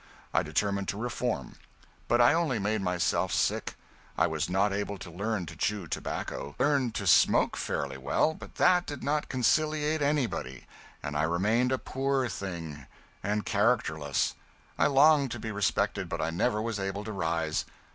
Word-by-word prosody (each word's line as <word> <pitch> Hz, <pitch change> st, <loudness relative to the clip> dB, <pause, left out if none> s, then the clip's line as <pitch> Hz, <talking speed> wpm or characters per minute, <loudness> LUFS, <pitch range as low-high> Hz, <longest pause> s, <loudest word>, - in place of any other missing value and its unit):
I -, -, +4 dB
determined 100 Hz, -1 st, -1 dB
to 100 Hz, -, -2 dB
reform. 120 Hz, -, -3 dB, 0.5 s
But 120 Hz, 0 st, +3 dB
I 120 Hz, +3 st, +6 dB
only 160 Hz, -7 st, +1 dB
made 105 Hz, +1 st, 0 dB
myself 90 Hz, -1 st, 0 dB
sick; -, -, 0 dB, 0.4 s
I -, -, +4 dB
was 80 Hz, +1 st, -1 dB
not 100 Hz, +2 st, +2 dB
able 100 Hz, 0 st, -2 dB
to 90 Hz, -1 st, -9 dB
learn 100 Hz, +2 st, -2 dB
to -, -, -9 dB
chew 105 Hz, -3 st, -1 dB
tobacco. 75 Hz, -2 st, -4 dB
I -, -, +3 dB
learned 135 Hz, -6 st, +1 dB
to -, -, -2 dB
smoke -, -, +4 dB
fairly 65 Hz, -1 st, -3 dB
well, 155 Hz, -, +1 dB
but -, -, -12 dB
that 180 Hz, -1 st, +4 dB
did 145 Hz, -2 st, -6 dB
not 150 Hz, +1 st, 0 dB
conciliate 155 Hz, +4 st, +1 dB
anybody, 130 Hz, -, -1 dB, 0.4 s
and 70 Hz, -, -4 dB
I 75 Hz, -, +2 dB
remained 105 Hz, +10 st, +2 dB
a 130 Hz, -, +2 dB
poor 135 Hz, 0 st, -1 dB
thing, 85 Hz, -9 st, -6 dB, 0.3 s
and 105 Hz, +2 st, -1 dB
characterless. 100 Hz, -, +1 dB, 0.4 s
I -, -, +3 dB
longed 145 Hz, 0 st, +5 dB
to 120 Hz, -, -6 dB
be 110 Hz, 0 st, -4 dB
respected, 100 Hz, -2 st, 0 dB
but 85 Hz, -2 st, -3 dB
I 80 Hz, -, -1 dB
never 105 Hz, +5 st, 0 dB
was 115 Hz, -2 st, -2 dB
able 95 Hz, +1 st, -3 dB
to 110 Hz, -, -5 dB
rise. 80 Hz, -4 st, -1 dB
105 Hz, 170 wpm, -29 LUFS, 85-130 Hz, 0.5 s, I